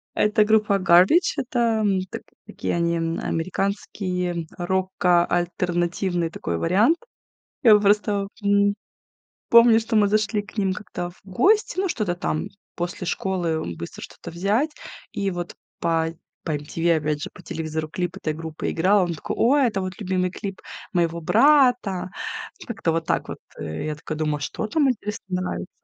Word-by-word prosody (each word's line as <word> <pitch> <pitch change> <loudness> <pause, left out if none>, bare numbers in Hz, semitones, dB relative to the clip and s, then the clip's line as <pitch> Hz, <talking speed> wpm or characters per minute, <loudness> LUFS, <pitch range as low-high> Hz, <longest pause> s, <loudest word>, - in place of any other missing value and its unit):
Это 210 +1 +3
группа 210 -2 +3
Garbage. 185 - +5
Это 235 -3 +1 0.3
так - - -7 0.2
такие - - -3
они, 170 0 +1
м, 165 0 -1
американские, 180 -1 -2
рокоальтернативный 175 -1 0
такой 85 - -3
вариант. 210 - +3 0.7
Я 220 -4 +8
просто, 205 -1 +2 0.2
м, 200 0 +3 0.8
помню, 235 -1 +8
что 225 +1 -4
мы 205 -1 +5
зашли 215 0 +1
к 205 - -16
ним 195 -2 +2
как-то 180 -2 -5
в 175 - -22
гости, 380 - +2
ну, 385 0 +1
что-то 215 - -1
там 155 -3 -2 0.3
после 175 +1 -4
школы 170 - -2
быстро 85 - -8
что-то - - -9
взять, 200 - +1 0.4
и 200 -1 -1
вот 175 -1 -5 0.3
по 165 -1 +1 0.4
по - - -2
MTV 160 +3 0
опять 150 -1 -2
же, - - -5
по - - -13
телевизору 160 -2 -4
клип 175 +3 -3
этой 155 - -2
группы 160 0 -5
играл, 190 +4 +3
он 170 -1 -2
такой: - - -5
"Ой, 270 +3 +4
это 210 -4 -1
вот 185 0 -4
любимый 185 -3 0
клип 195 +1 -6 0.3
моего 170 -2 0
брата!" 245 - +4 0.6
Как-то 225 -8 -1
вот 165 0 -2
так - - 0
вот, - - -6 0.2
э. 80 - -4
Я 155 - -2
такая 155 +1 -6
думаю: 150 -2 -1
"Что 180 - -3
там, 280 +5 +2
интересно, 210 -3 -4 0.2
нравится?" 85 - -4
185 Hz, 155 wpm, -23 LUFS, 170-210 Hz, 0.8 s, Я